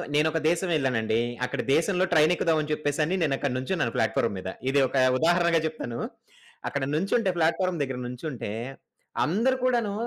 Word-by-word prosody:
నేనొక 155 +2 +2
దేశం 175 +2 0
ఎళ్ళానండి. 115 -5 0 0.3
అక్కడ 125 - -3
దేశం‌లో 180 +3 +2
ట్రైన్ 155 0 +5
ఎక్కుదాం 165 -2 +1
అని 155 0 -4
చెప్పేసని 150 +3 0
నేను 150 -4 +2
అక్కడ 140 - -1
నుంచున్నాను 130 0 -1
ప్లాట్‌ఫా‌ర్మ్ - - +1
మీద. 95 - -5 0.2
ఇది 140 +1 +3
ఒక 135 - -3 0.2
ఉదాహరణగా 170 +2 +3
జెప్తాను. 135 -7 -4 0.7
అక్కడ 145 - -2
నుంచుంటే 195 +6 +1
ప్లాట్‌ఫా‌ర్మ్ 170 +2 +1
దెగ్గర 130 -3 -2
నుంచుంటే, 125 -2 -5 0.7
అందరు 230 - +1
కూడాను 235 -5 +1
155 Hz, 150 wpm, -26 LUFS, 135-175 Hz, 0.7 s, ట్రైన్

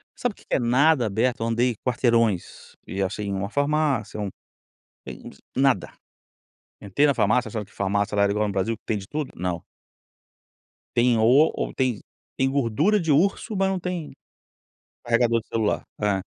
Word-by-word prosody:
Sabe, 245 -3 -2
o - - -33
que - - -21
que - - 0
é - - +2
nada 130 +3 +3
aberto, 115 +4 0
eu 115 - 0
andei 120 +1 +1
quarteirões, 115 -6 0
e 95 - -3
achei 105 +2 -3
em 100 - -2
uma 100 +1 -3
farmácia 145 -5 0
um, 105 - -2 0.8
eh, - - -5
ens - - -12 0.2
nada. 135 -7 +2 0.9
Entrei 100 +9 +2
na 140 - +3
farmácia, 115 +1 +2
sabe, 110 -2 -4
que 100 - -24
farmácia 100 +1 -1
lá 100 0 +4
igual 105 +1 +1
no - - -2
Brasil 100 +4 0
que - - -51
tem 110 - -1
de 95 -1 -8
tudo? 150 +2 -4
Não. 90 -1 -3 1.3
Tem 120 0 +4
o - - +2 0.3
ou - - -3
tem 125 -5 0 0.4
tem 130 - +2
gordura 140 - +2
de 165 -2 -2
urso, 195 +7 +2
mas 195 0 +2
não 190 -1 -1
tem 180 -3 -4 0.9
carregador 115 -1 +2
de 115 - -20
celular, 110 -2 0 0.2
é. 100 -2 +1
115 Hz, 180 wpm, -24 LUFS, 105-140 Hz, 1.3 s, lá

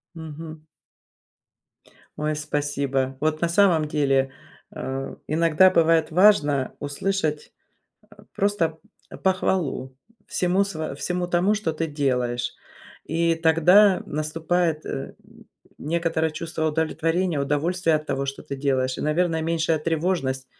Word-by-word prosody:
Мгм. 160 0 -9 1.6
Ой, 150 0 -1
спасибо. 140 -3 -2
Вот 155 0 0
на 170 - +1
самом 170 -4 +3
деле, 135 -3 +1 0.4
а, 135 +1 -5
иногда 165 +3 +4
бывает 165 -2 +3
важно 155 -7 +3
услышать 150 +1 -2 0.8
просто 175 -6 0 0.4
похвалу 175 -8 0 0.3
всему 185 +2 +1
сво 155 -7 -5
всему 180 +4 -2
тому, 180 +4 +2
что 200 -6 -2
ты 160 +1 -2
делаешь, 125 -5 -1 0.5
и 165 +1 +1
тогда 175 +5 +5
наступает, 155 +2 -1
э, 135 - -5 0.6
некоторое 160 0 -1
чувство 160 0 -3
удовлетворения, 160 +1 0
удовольствие 160 +3 +1
от 155 0 -6
того, 140 -1 -2
что 135 - -5
ты 140 - -6
делаешь, 130 -2 0
и, - - -4
наверное, 160 +1 0
меньшая 165 -1 0
тревожность. 155 -5 -1
160 Hz, 110 wpm, -24 LUFS, 145-170 Hz, 1.6 s, тогда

